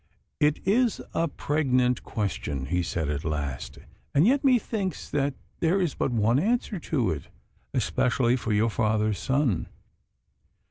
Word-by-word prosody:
'It 150 0 +3
is 230 +3 +3
a 165 - +1
pregnant 130 -5 +1
question,' 75 - -3
he 90 +5 0
said 85 -3 -2
at 75 0 -2
last, 70 -4 -3 0.4
'and 145 +5 +5
yet 270 +5 +3
methinks 225 - +1
that 140 -1 0 0.2
there 175 +4 +2
is 175 -6 0
but - - -1
one 115 +2 +3
answer 220 +1 0
to 140 -7 0
it, 75 -4 -5 0.5
especially 125 -1 +2
for 115 -3 -3
your 110 +2 +2
father's 110 -2 +1
son. 130 - +1
125 Hz, 140 wpm, -27 LUFS, 105-165 Hz, 0.5 s, and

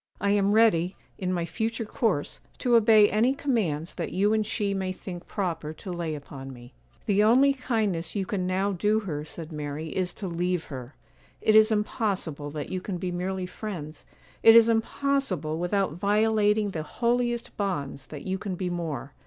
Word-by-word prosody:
I 200 0 +1
am 200 0 +3
ready, 195 -5 +4 0.2
in 185 -1 -1
my 175 -2 -1
future 225 +6 -2
course, 210 - -1 0.2
to 245 -2 +2
obey 220 -2 +7
any 235 +7 +2
commands 185 - -1
that - - -4
you 205 +3 +2
and 220 0 +2
she 205 -2 -1
may 190 -1 -2
think 180 -2 -8
proper 165 -5 -3
to 185 +4 -8
lay 170 -3 -3
upon 135 -2 -9
me.' 120 -1 -13 0.3
'The 205 0 +3
only 260 +6 +5
kindness 220 -11 -1
you 195 -2 0
can 185 -1 -2
now 190 +2 +1
do 210 +4 +1
her,' 150 -7 -4
said 160 +1 -9
Mary, 150 +1 -5
'is 185 -1 -1
to 200 - -5
leave 175 0 -1
her. 130 -3 -8 0.4
It 215 - +3
is 215 0 +7
impossible 195 -8 -1
that 145 0 -5
you 185 -1 -3
can 185 -1 -4
be 180 0 -3
merely 185 +1 -2
friends,—it 180 +3 0
is 230 0 +8
impossible, 225 - 0
without 185 -1 0
violating 210 +2 +2
the 160 - -3
holiest 240 +6 -1
bonds, 145 -9 -3
that 150 -2 -8
you 190 0 -2
can 195 -2 -4
be 180 0 -3
more. 155 -6 -4
190 Hz, 180 wpm, -27 LUFS, 165-215 Hz, 0.4 s, is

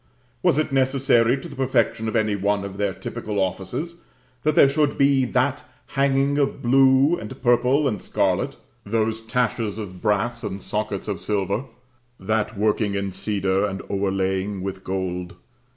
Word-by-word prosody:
Was - - +3
it 155 -1 0
necessary 130 -2 +3
to 170 - -8
the 145 - -10
perfection 125 -4 +1
of 110 - -3
any 110 -1 +2
one 100 0 0
of 100 0 -7
their 100 -1 0
typical 105 +2 -5
offices, 150 - -3 0.4
that 155 +2 +1
there - - +7
should 145 +1 +1
be 140 -2 +4
that 130 +4 0 0.3
hanging 140 +1 +2
of 140 -1 0
blue, 135 +5 +4
and 105 - -8
purple, 125 +4 +3
and 105 -7 -2
scarlet? - - 0 0.3
those 110 +1 -1
taches 115 -2 -1
of 95 -4 -7
brass 105 +2 0
and 100 -1 -5
sockets 105 -2 -3
of 100 -4 -3
silver? 105 +4 -1 0.5
that 105 +2 -1
working 105 -1 +1
in 100 -1 -2
cedar 95 -1 0
and 95 -2 -3
overlaying 95 0 -1
with 95 -1 -5
gold? 90 -2 -3
110 Hz, 155 wpm, -23 LUFS, 100-135 Hz, 0.5 s, there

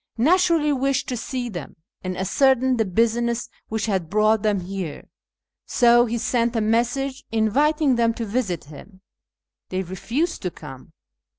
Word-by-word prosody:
) - - -40
naturally 330 +2 +3
wished 275 0 0
to 255 - -2
see 245 +1 -4
them 175 -10 -7 0.3
and 185 -1 -4
ascertain 260 +5 +2
the 225 - +2
business 235 +4 0 0.2
which 220 -1 -2
had 190 -7 -1
brought 215 +1 +3
them 205 -3 +1
here, 185 -3 -6 0.6
so 240 0 +4
he 235 +1 -2
sent 235 +1 0
a 225 - +1
message 245 +5 0
inviting 270 +5 +2
them 230 -1 +3
to 230 0 -4
visit 205 -6 -2
him. 185 +6 -14 0.7
They 185 +1 -2
refused 235 - -2
to 180 - -2
come. 150 -3 -12
230 Hz, 155 wpm, -23 LUFS, 195-260 Hz, 0.7 s, so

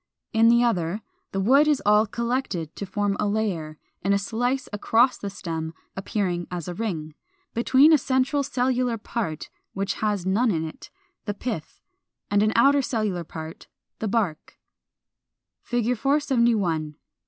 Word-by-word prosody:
In 225 +1 +5
the 235 +1 +5
other, 195 -3 0 0.3
the 195 - -2
wood 270 +10 +5
is 295 -3 +3
all 210 +1 +5
collected 235 - -2
to 200 - -5
form 205 +1 0
a 210 - +1
layer 185 -8 -2 0.2
(in 200 +1 +2
a - - +4
slice 245 +6 -1
across 230 +5 +3
the 200 - -4
stem 165 -4 -5 0.2
appearing 190 -3 -2
as 175 -3 -5
a 180 - -3
ring) 170 -7 -4 0.4
between 265 +6 +5
a 305 - +6
central 260 +2 +1
cellular 255 -3 0
part 205 -7 -4 0.2
which 195 +1 -1
has 205 -4 0
none 215 +6 +2
in 160 -5 0
it, 155 - -11 0.4
the 205 -1 -3
Pith, 210 -8 -5 0.5
and 205 0 +4
an 215 +1 +3
outer 275 +4 +5
cellular 215 -9 -1
part, 160 0 -9 0.3
the 220 - -2
Bark. 200 -8 -2 1.1
[Illustration: 240 -2 +1
Fig. - - -5
471. 235 - +1
210 Hz, 155 wpm, -25 LUFS, 180-245 Hz, 1.1 s, a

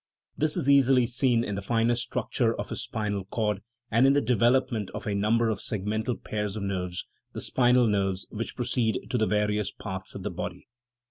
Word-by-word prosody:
This 155 0 +1
is - - -1
easily 135 -3 +5
seen 120 -1 +2
in 105 - -3
the 100 - -3
finer 115 +3 +2
structure 120 - -1
of - - -4
his - - -3
spinal 105 -3 -3
cord, 105 -1 -1 0.3
and 115 +4 +5
in 135 - +5
the 145 - +4
development 120 -1 +2
of - - -6
a 105 - -1
number 110 +3 +2
of 105 -3 -1
segmental 110 +4 -2
pairs 105 -1 -3
of 105 - -4
nerves, 90 -2 -3 0.3
the - - -5
spinal 125 -1 +3
nerves, 100 -3 0
which 115 +1 -4
proceed 120 -3 -1
to 125 - +1
the 110 - +2
various 105 0 +1
parts 95 -2 -6
of - - -6
the - - -3
body. - - -6
110 Hz, 195 wpm, -27 LUFS, 100-125 Hz, 0.3 s, easily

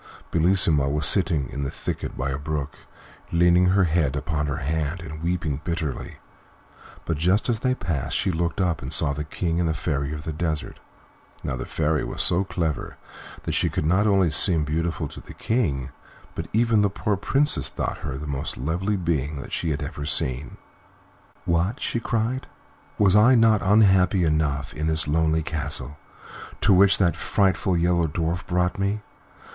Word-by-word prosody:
Bellissima 80 -5 +3
was 75 +2 0
sitting 85 -9 +5
in 70 - -7
a - - -2
little - - -2
thicket - - -4
by 70 +2 -2
a 65 - -3
brook, 75 -1 -4 0.6
leaning 85 +1 +4
her 95 +1 +3
head 80 -5 +1
upon 75 0 -2
her 70 - -2
hand 80 +4 -2
and 80 -1 -8
weeping 85 -4 -2
bitterly, 85 -6 -4 0.9
but 80 - -1
just 90 +6 +2
as 115 -2 +1
they 130 +1 0
passed 85 - -2
she 95 - +1
looked 85 +1 -2
up 90 -4 0
and 65 - -6
saw 70 - +3
the 75 +2 -4
King 85 +2 -2
and 85 -2 +1
the 80 - -1
Fairy 70 -1 -2
of 75 0 -6
the 80 - -4
Desert. 80 -1 -3 0.6
Now, - - -2
the - - -6
Fairy 75 -1 0
was - - -3
so 90 +3 +2
clever 85 -5 -3 0.5
that - - -3
she - - +2
could - - -2
not 95 +6 +3
only 95 -5 +3
seem 85 -4 +3
beautiful 80 +2 -2
to - - -11
the - - -13
King, 70 - -1 0.4
but - - -5
even 115 -1 +3
the 100 - +3
poor 105 +1 -1
Princess 140 +9 +1
thought - - -4
her 65 - -5
the 75 - -7
most 70 -2 -4
lovely 90 +9 -1
being 75 -5 -2
she 85 - -2
had 75 0 -2
ever 75 0 -6
seen. 65 -2 0 0.9
"What!" 85 +8 0
she 120 - -2
cried; 115 +3 -2 0.5
"was 100 -2 +4
I 115 +5 +6
not 115 -3 +4
unhappy 95 -3 +4
enough 75 -3 0
in 75 +1 -3
this 80 -1 +1
lonely 80 +1 +1
castle 75 -1 -4 0.6
to 100 - +5
which 95 +1 +6
that 85 -3 +2
frightful 95 -2 +1
Yellow 85 0 +2
Dwarf 85 +3 -3
brought 90 +1 0
me? 100 +2 -1
85 Hz, 180 wpm, -24 LUFS, 75-95 Hz, 0.9 s, I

